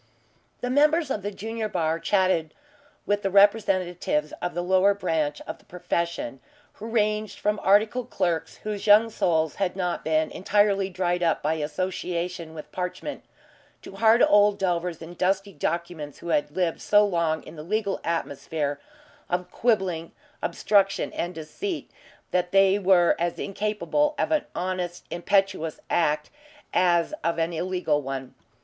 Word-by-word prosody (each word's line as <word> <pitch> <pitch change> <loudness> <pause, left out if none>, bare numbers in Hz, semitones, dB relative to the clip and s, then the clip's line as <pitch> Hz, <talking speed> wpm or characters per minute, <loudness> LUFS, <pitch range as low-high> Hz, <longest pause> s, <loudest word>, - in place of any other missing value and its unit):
The 245 - -2
members 300 +2 +3
of 210 - -1
the 200 - -3
junior 220 +2 -4
bar 165 -3 0
chatted 185 -5 +1 0.5
with 205 0 +1
the 195 - 0
representatives 185 -6 +2
of 175 - -3
the 175 - -1
lower 190 +2 +4
branch 160 -6 -1
of - - -7
the - - -24
profession 180 - -3 0.3
who 220 - -9
ranged 215 -1 0
from 210 0 0
articled 215 +5 +3
clerks 175 -6 -1
whose 210 -1 -4
young 215 +2 +6
souls 160 -6 +1
had 190 -3 -1
not 180 -2 -2
been 155 0 +1
entirely 200 0 +2
dried 180 -1 -1
up 170 -2 +1
by 155 +2 +1
association 170 +1 -3
with 155 - -9
parchment, 180 +10 -4 0.6
to 195 - -10
hard 225 +2 +5
old 205 0 +5
delvers 175 -3 -1
in 165 +2 -9
dusty 195 +2 0
documents 165 -1 -3
who 170 - -8
had 150 -2 +1
lived 170 +1 -1
so 210 0 +5
long 170 -5 0
in 160 - -11
the 150 - -8
legal 200 +4 -1
atmosphere 150 -2 -2 0.5
of 180 0 -2
quibbling, 190 -8 0 0.3
obstruction, 195 -2 +1
and 175 +1 -3
deceit, 315 - -5 0.4
that 180 -1 0
they 195 0 +5
were 185 -3 +4
as 170 0 -1
incapable 215 +9 -1
of 310 - 0
an 310 -2 +2
honest 180 -1 -3
impetuous 175 -3 0
act 150 -2 +1 0.4
as 175 - +3
of 170 0 0
an 165 +1 0
illegal 175 -3 0
one. 135 -1 -5
180 Hz, 150 wpm, -25 LUFS, 165-205 Hz, 0.6 s, young